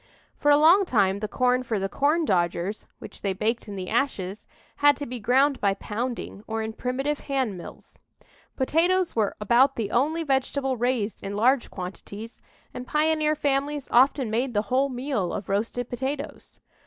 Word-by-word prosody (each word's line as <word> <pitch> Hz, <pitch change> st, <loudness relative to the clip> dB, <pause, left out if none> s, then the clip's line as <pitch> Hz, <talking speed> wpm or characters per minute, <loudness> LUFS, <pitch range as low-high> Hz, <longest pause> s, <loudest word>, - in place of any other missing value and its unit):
For 290 Hz, -, +1 dB
a 290 Hz, -, +7 dB
long 335 Hz, +7 st, +6 dB
time 200 Hz, -, +2 dB
the 215 Hz, -, -3 dB
corn 250 Hz, +3 st, +1 dB
for 235 Hz, -4 st, -2 dB
the 195 Hz, 0 st, -1 dB
"corndodgers" 205 Hz, -, 0 dB
which -, -, -11 dB
they 195 Hz, -2 st, -1 dB
baked 225 Hz, +5 st, -2 dB
in 205 Hz, -, -6 dB
the 185 Hz, -1 st, -5 dB
ashes, 200 Hz, -7 st, -2 dB, 0.3 s
had 290 Hz, -1 st, +5 dB
to 285 Hz, -, -5 dB
be 250 Hz, -1 st, -6 dB
ground 265 Hz, +5 st, +2 dB
by 200 Hz, -1 st, +2 dB
pounding, 225 Hz, 0 st, -5 dB
or 225 Hz, 0 st, -2 dB
in 220 Hz, 0 st, -4 dB
primitive 270 Hz, +5 st, -2 dB
hand 265 Hz, -7 st, -2 dB
mills. 175 Hz, -, -12 dB, 0.6 s
Potatoes 345 Hz, +6 st, +1 dB
were 215 Hz, -3 st, +1 dB
about 240 Hz, +6 st, +4 dB
the 215 Hz, -3 st, -3 dB
only 310 Hz, +7 st, +1 dB
vegetable 270 Hz, -1 st, 0 dB
raised 240 Hz, -3 st, -1 dB
in 200 Hz, 0 st, -4 dB
large 245 Hz, +4 st, +2 dB
quantities, 200 Hz, +4 st, -8 dB, 0.3 s
and 250 Hz, 0 st, -7 dB
pioneer 310 Hz, 0 st, +2 dB
families 285 Hz, 0 st, -1 dB
often 255 Hz, -1 st, +4 dB
made 240 Hz, +2 st, -1 dB
the 205 Hz, -, +2 dB
whole 270 Hz, +2 st, +3 dB
meal 250 Hz, -8 st, -2 dB
of 195 Hz, -, -5 dB
roasted 225 Hz, +4 st, -1 dB
potatoes. 265 Hz, +4 st, -5 dB
250 Hz, 165 wpm, -25 LUFS, 210-280 Hz, 0.6 s, a